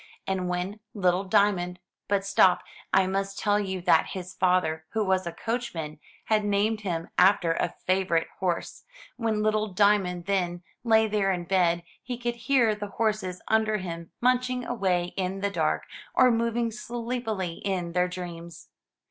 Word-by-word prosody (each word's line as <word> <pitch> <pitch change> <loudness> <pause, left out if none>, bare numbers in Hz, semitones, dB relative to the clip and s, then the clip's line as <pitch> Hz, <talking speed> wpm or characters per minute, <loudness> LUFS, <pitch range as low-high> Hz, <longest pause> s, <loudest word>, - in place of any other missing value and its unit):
And 185 -2 -1
when 180 +4 -3 0.2
little 185 -1 +2
Diamond 185 -2 +2 0.2
— - - -63
but 200 -1 +1
stop, 190 -2 +4 0.3
I 190 0 +4
must 195 +1 -2
tell 205 -1 +2
you 190 -2 -3
that 170 -3 +4
his 185 0 -6
father 180 -4 +1
who 220 -1 +1
was 190 -1 +1
a - - -2
coachman, 175 -10 -4 0.3
had 215 -1 +2
named 205 +2 +1
him 170 -4 -3
after 180 -3 +5
a - - -2
favorite 185 -3 +2
horse 180 -3 -2 0.2
— - - -21
when 220 -3 0
little 215 0 +1
Diamond, 190 -3 +2
then, 180 -3 -1 0.2
lay 220 -2 +4
there 205 -2 +1
in 175 -2 -2
bed, 175 -2 +2 0.2
he 245 -1 -5
could 240 0 -3
hear 245 -6 +4
the 210 0 -5
horses 210 -3 -2
under 220 -1 +2
him 170 -3 -6
munching 250 0 +1
away 180 -6 0
in 190 +1 -2
the 200 0 0
dark, - - 0 0.3
or 255 -1 +6
moving 230 0 0
sleep 240 +1 -4
ily 185 -6 -3
in 180 -3 -1
their 180 +1 +2
dreams. 170 -2 -8
195 Hz, 165 wpm, -27 LUFS, 180-215 Hz, 0.3 s, or